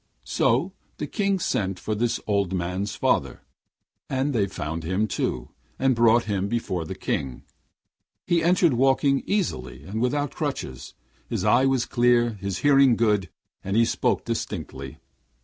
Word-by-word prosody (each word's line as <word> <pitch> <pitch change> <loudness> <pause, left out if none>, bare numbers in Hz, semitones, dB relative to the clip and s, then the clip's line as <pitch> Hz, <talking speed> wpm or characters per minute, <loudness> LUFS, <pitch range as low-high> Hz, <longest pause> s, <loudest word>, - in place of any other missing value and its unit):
So - - +1 0.2
the - - -3
King 200 -2 0
sent 95 - -1
for 110 - -3
this 115 +3 0
old 100 -3 0
man's 90 +3 -2
father, - - 0 0.7
and 135 +2 0
they 105 -5 +1
found 80 -3 -5
him 95 +6 0
too, 65 - -2 0.3
and 135 0 +2
brought 115 0 +4
him 100 -2 -1
before 100 -7 -2
the - - -6
King. 65 -3 -3 0.8
He 170 -1 +2
entered 170 -2 +3
walking 135 +2 +3
easily 65 - -2
and 110 +4 -4
without 145 +3 0
crutches: 65 -2 -5 0.3
his - - -2
eye 130 +2 +4
was 135 -3 +1
clear, 120 -1 +3
his 100 -3 -4
hearing 135 -3 +6
good, 105 -5 +1 0.3
and 100 +2 -1
he 115 - +5
spoke - - 0
distinctly. 65 0 -5
115 Hz, 150 wpm, -25 LUFS, 95-135 Hz, 0.8 s, hearing